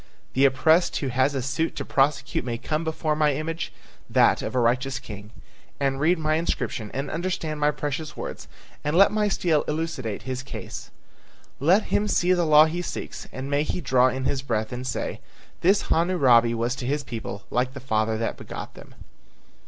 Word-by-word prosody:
The 135 +2 +4
oppressed 160 +6 +3
who 135 - -2
has 130 +3 +1
a 130 - -1
suit 145 +6 -1
to - - -4
prosecute 140 +2 +1
may 120 -2 -3
come 155 +6 -2
before 160 -1 -1
my 150 -2 +2
image, 165 +3 -3 0.4
that - - +4
of - - -4
a - - +3
righteous 130 +3 +1
king, 105 0 -9 0.5
and 135 -1 0
read 165 +5 +3
my 155 0 +1
inscription 140 -8 -2
and 135 +2 -4
understand 165 -3 -3
my 150 0 +3
precious 150 +1 -4
words - - -6 0.4
and 150 +3 0
let 195 +1 +7
my 210 0 +1
stele 170 -6 +2
elucidate 150 -9 -3
his 130 0 -4
case. 135 - -8 0.7
Let 180 +10 +4
him 210 - +2
see 180 -2 +3
the 175 -2 +1
law 155 0 +8
he 170 +3 -2
seeks, - - -6
and 130 +1 -6
may 145 0 +2
he 155 - -2
draw 130 -5 +3
in 130 +1 -2
his 135 -1 0
breath 110 -5 -2
and 125 +1 -5
say: 130 - -3 0.4
'This 195 +4 +4
Hammurabi 130 -10 +4
was 120 +2 0
to 125 - -4
his 145 +2 0
people 110 -5 -6
like 125 +1 0
the - - -5
father 110 -3 0
that 115 +1 -2
begot - - -8
them!'" - - -14
140 Hz, 190 wpm, -25 LUFS, 130-160 Hz, 0.7 s, law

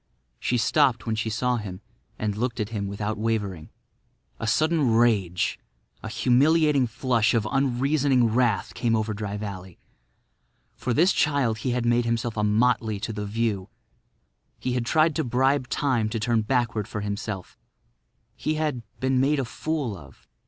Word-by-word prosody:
She 125 - 0
stopped 125 -2 +2
when 115 - -1
she 110 0 -1
saw 125 +3 0
him 95 -4 -6 0.4
and 105 -1 -2
looked 120 +2 -2
at 105 -1 -2
him 105 -3 -3
without 105 +2 -3
wavering. 105 -7 -2 0.7
A 115 - -3
sudden 155 +4 +2
rage—a 105 -3 -1
humiliating 140 +4 +3
flush 120 -1 +1
of 110 -2 +1
unreasoning 135 0 +2
wrath—came 120 0 +1
over 110 0 -1
Dry 105 0 -4
Valley. 95 -4 -7 1.0
For 125 - -3
this 170 - +4
child 135 -7 +1
he 130 - -2
had 120 -1 0
made 120 0 +2
himself 115 0 -1
a 105 - 0
motley 110 0 +2
to 115 +1 -4
the 105 -1 -4
view. 105 -2 -1 0.9
He 125 - -2
had 120 -2 -1
tried 155 +1 +3
to - - +1
bribe 130 +2 +1
Time 125 -7 0
to 115 +1 -3
turn 115 +1 +1
backward 115 -2 0
for 110 -4 -5
himself; 100 -2 -5 0.8
he 155 - -2
had—been 130 -3 -1
made 140 +3 +2
a 135 - -1
fool 145 -3 -3
of. - - -15
115 Hz, 150 wpm, -25 LUFS, 105-130 Hz, 1.0 s, this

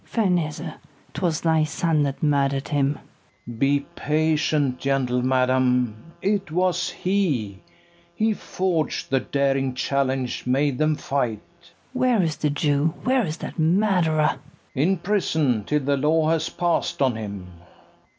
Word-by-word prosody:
Ferneze, 180 -9 0 0.5
'twas 170 -4 -1
thy 160 -1 +3
son 155 0 0
that 140 0 -2
murder'd 140 -2 +1
him. 140 -1 +1 0.5
FERNEZE. 115 -1 -9
Be 140 +1 +3 0.2
patient, 150 -3 +1
gentle 130 -2 0
madam: 125 +1 +1
it 200 -2 0
was 180 +2 0
he; 150 - -1 0.6
He 220 +2 +1
forg'd 180 -9 -2
the 135 - +3
daring 135 -1 0
challenge 130 -2 -1
made 135 +1 +1
them 155 0 +2
fight. 125 -8 -2 0.2
KATHARINE. 175 - -26
Where 250 -5 +2
is 160 -2 -1
the 150 - 0
Jew? 145 +1 +1
where 260 -1 +2
is 155 +1 -4
that - - -7
murderer? 165 -3 +3 0.4
FERNEZE. 140 +4 +1
In 190 - +2
prison, 160 - 0
till 150 +4 0
the 140 +1 +1
law 155 +3 +2
has 160 -1 +1
pass'd 175 -1 -1
on 130 -3 +2
him. 100 -4 -6
150 Hz, 140 wpm, -23 LUFS, 135-165 Hz, 0.6 s, thy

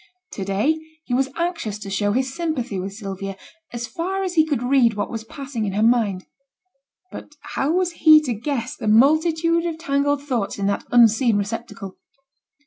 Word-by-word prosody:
To 195 - -5
day 205 +12 0 0.2
he 250 - -5
was 265 +2 +1
anxious 335 - -2
to 200 -2 -8
show 205 +1 0
his 260 +2 -1
sympathy 265 - -3
with 195 +2 -5
Sylvia, 195 -2 -6 0.3
as 240 0 -4
far 365 +11 -3
as 370 -2 -3
he 320 -3 +5
could 280 -6 -1
read 245 -3 +3
what 205 - -3
was 225 -2 -5
passing 265 -1 -6
in 195 - -3
her 210 +2 +1
mind; 220 -5 +2 0.9
but 295 - -10 0.2
how 280 - 0
was 360 0 +1
he 315 -2 +6
to 255 -5 -1
guess 235 +1 -3
the 220 - -6
multitude 320 +8 +3
of 325 -2 -4
tangled 285 -2 0
thoughts 240 -8 -2
in 200 - -2
that 200 0 -1
unseen 230 -1 +4
receptacle? 205 -1 -5
245 Hz, 180 wpm, -22 LUFS, 210-310 Hz, 0.9 s, he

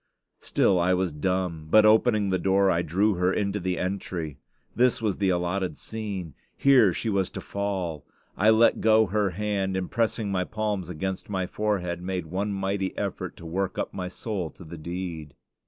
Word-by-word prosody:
Still 95 - +2
I 90 +1 +3
was 90 -1 0
dumb; 85 0 -2
but, 110 +4 +6
opening 110 -1 +4
the 95 - +1
door, 95 +1 +3
I 85 - +2
drew 100 +6 +2
her 90 +1 +2
into 100 +1 -1
the 90 -1 -2
entry. 90 -5 -3 0.4
This 125 +1 +3
was 110 -4 -1
the 100 -2 +1
allotted 90 +1 -1
scene; 100 -8 -5 0.2
here 130 -8 +6
she 115 - -4
was 100 -4 +1
to - - -7
fall. 95 -7 -3 0.3
I 105 +3 +4
let 110 +1 +5
go 110 0 +5
her 105 +1 +1
hand, 95 0 -1
and 95 -1 -3
pressing 110 -3 0
my 90 -1 +1
palms 105 -3 -3
against 95 +4 -4
my 95 -2 -1
forehead, 90 -4 -2
made 90 -1 -3
one 95 +5 -2
mighty 95 0 -2
effort - - -4
to 85 - -11
work 95 +3 -2
up - - -3
my 90 -1 -4
soul 95 -2 -4
to 90 - -14
the 85 +1 -9
deed. 85 -3 -6
95 Hz, 185 wpm, -26 LUFS, 90-105 Hz, 0.4 s, but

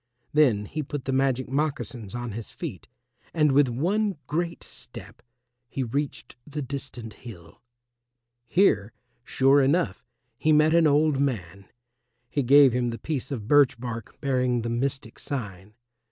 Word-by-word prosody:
Then 125 -9 +3
he 155 +9 -4
put 145 -1 -6
the 135 - -1
magic 130 -1 +1
moccasins 125 -6 -3
on 120 -1 -4
his 110 +2 -7
feet - - -7 0.5
and 150 -3 +4
with 140 0 +4
one 185 - 0
great 170 +2 -3
step 120 - -12 0.5
he 135 - -3
reached 140 0 -4
the 150 0 -4
distant 130 -4 -7
hill. 100 -2 -13 0.9
Here, 110 - +2 0.3
sure 135 +3 +4
enough, 140 -1 +1 0.4
he 155 - +2
met 155 +1 +4
an 165 -1 +5
old 150 -1 +3
man. 100 -9 -3 0.6
He 145 - 0
gave 135 0 +6
him 125 -1 0
the 115 - -4
piece 135 +2 -4
of 115 -7 -5
birch 140 -3 +4
bark 115 -2 -7
bearing 125 -3 +1
the 115 - -2
mystic 125 0 -3
sign. 105 -7 -6
135 Hz, 145 wpm, -26 LUFS, 115-145 Hz, 0.9 s, gave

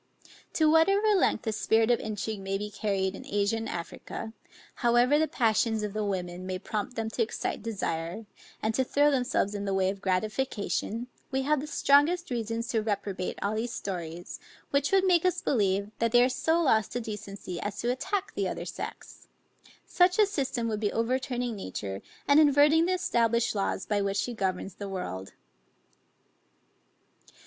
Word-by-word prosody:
To 315 - +3
whatever 390 +7 +4
length 365 - +2
the 225 - -1
spirit 225 +2 +2
of 240 - +3
intrigue 215 0 -4
may 195 0 -2
be 210 +1 -5
carried 195 -3 -1
in - - -9
Asia 205 +2 0
and 225 0 -4
Africa, 200 +5 -6 0.4
however 240 +4 +4
the 315 - +2
passions 225 -5 +1
of 210 -1 -3
the 215 0 -1
women 185 -2 -3
may 185 0 -2
prompt 210 +5 -4
them 225 -1 -2
to 235 - -2
excite 225 - -2
desire, 200 -2 -3 0.4
and 220 +1 +1
to 260 - +2
throw 290 +3 +3
themselves 250 -6 +1
in 205 -1 -4
the 195 -1 0
way 190 0 +2
of 195 -1 -9
gratification, 215 +3 -1 0.2
we 265 0 -1
have 300 +1 +2
the 295 - -5
strongest 300 +4 +3
reasons 230 -1 -2
to 225 - +1
reprobate 200 -3 -3
all 200 +1 0
these 230 +2 -2
stories, 175 -3 -5 0.3
which 280 0 +1
would 385 -1 +4
make 355 -3 +4
us 365 -1 +2
believe, 200 - +1
that 230 -1 +1
they 240 +1 +6
are 250 - +3
so 320 +6 +1
lost 220 -8 +2
to 245 - -1
decency 200 -5 -6
as 205 -1 -4
to 240 - +1
attack 370 +10 -2
the - - -1
other - - -4
sex: - - -8 0.6
such 360 0 +3
a 425 - +6
system 270 - -2
would 215 -2 -2
be 210 -1 0
overturning 245 0 -1
nature, 100 - -5 0.3
and 285 +1 +6
inverting 300 +2 +5
the 370 - +2
established 235 -10 +1
laws 195 -1 -1
by 205 -1 0
which 200 0 -1
she 240 +4 -1
governs 190 -3 -2
the 200 +1 -7
world. 95 - -5
225 Hz, 175 wpm, -28 LUFS, 200-265 Hz, 0.6 s, they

